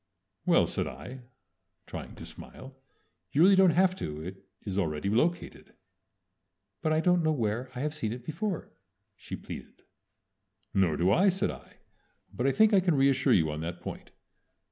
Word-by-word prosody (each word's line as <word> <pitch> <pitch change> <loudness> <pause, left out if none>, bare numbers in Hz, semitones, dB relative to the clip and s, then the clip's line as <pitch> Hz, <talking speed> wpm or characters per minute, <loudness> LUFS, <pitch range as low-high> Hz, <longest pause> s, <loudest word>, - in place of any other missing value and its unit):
"Well," - - +5
said - - -2
I, 95 - -8 0.7
trying - - -8
to - - -9
smile, 130 +1 -11 0.6
"you 150 - +4
really 195 +2 +7
don't 190 -1 +6
have 185 +3 +3
to. 75 - -5
It 95 +3 -8 0.2
is 100 -1 -2
already 80 +1 -1
located." 165 +10 -1 1.1
"But 155 - 0
I 155 - +3
don't 180 +1 +3
know 155 -1 +2
where 120 -2 -1
I 125 - -4
have 150 +1 -1
seen 145 -9 -3
it 120 +1 -7
before," 175 +5 -3 0.4
she - - -7
pleaded. - - -10 0.9
"Nor 95 -5 +2
do 90 +3 +3
I," 190 - +5
said 190 +1 0
I, 65 0 -13 0.6
"but 125 - 0
I - - +4
think 220 +6 +4
I 200 - +7
can 180 -4 +2
reassure 135 -1 +3
you 80 -6 +3
on 75 +1 -5
that 85 +1 -5
point. - - -8
130 Hz, 170 wpm, -29 LUFS, -, 1.1 s, really